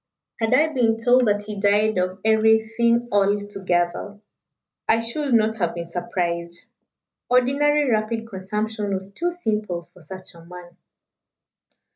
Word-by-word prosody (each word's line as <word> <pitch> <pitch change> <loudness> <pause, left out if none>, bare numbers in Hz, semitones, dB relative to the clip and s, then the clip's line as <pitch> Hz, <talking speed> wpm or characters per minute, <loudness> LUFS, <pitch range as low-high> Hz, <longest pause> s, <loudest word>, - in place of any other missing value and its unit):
Had 225 +2 +2
I 310 +3 +2
been 230 -4 +2
told 245 +1 +3
that 205 0 +1
he 210 -1 -7
died 205 0 +2
of 185 +1 -2
everything 220 +2 +3
all 205 0 +3
together, 195 0 -2 0.7
I 225 - +3
should 265 +5 -3
not 220 0 +2
have 175 -5 -1
been 170 0 -5
surprised. 170 0 -3 0.7
Ordinary 280 +4 +3
rapid 225 0 -1
consumption 210 +1 -3
was 190 +1 -6
too 345 +12 -2
simple 210 - -3
for 180 - -17
such 185 +4 -10
a 170 -1 -15
man." 175 0 -12
210 Hz, 135 wpm, -22 LUFS, 185-230 Hz, 0.7 s, told